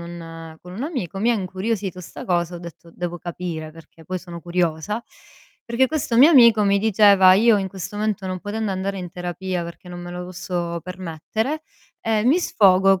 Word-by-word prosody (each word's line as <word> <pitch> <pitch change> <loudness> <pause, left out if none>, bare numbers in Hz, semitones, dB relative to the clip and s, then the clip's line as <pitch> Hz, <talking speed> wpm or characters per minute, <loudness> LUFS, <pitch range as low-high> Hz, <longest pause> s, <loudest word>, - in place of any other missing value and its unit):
un 165 -1 -9
con 180 - -11
un 220 +8 -4
amico, 245 - -4
mi 225 +4 +2
ha - - +3
incuriosito 190 -1 -3
'sta 175 - -9
cosa, 175 -1 0
ho - - -8
detto: 170 0 -11
"Devo 175 0 -4
capire", 170 -2 -5
perché 165 0 -16
poi 185 +3 -3
sono 170 -1 -9
curiosa, 175 +5 -1 0.6
perché 235 +3 +2
questo 275 -6 -1
mio 275 +7 +8
amico 235 -7 +7
mi 200 0 +3
diceva: 200 -3 +6
"Io 220 +2 +5
in 190 -1 -2
questo 190 +2 -7
momento 210 -3 -1
non 185 0 -3
potendo 210 +1 -3
andare 195 +1 -3
in 180 -2 -6
terapia 180 +1 -4
perché 170 +2 -10
non 175 0 -7
me 175 0 -7
lo 180 0 -5
posso 175 -1 -4
permettere, 185 - -4 0.4
ehm, 220 0 0
mi 305 +7 +5
sfogo 195 - +4
185 Hz, 190 wpm, -22 LUFS, 175-210 Hz, 0.6 s, mio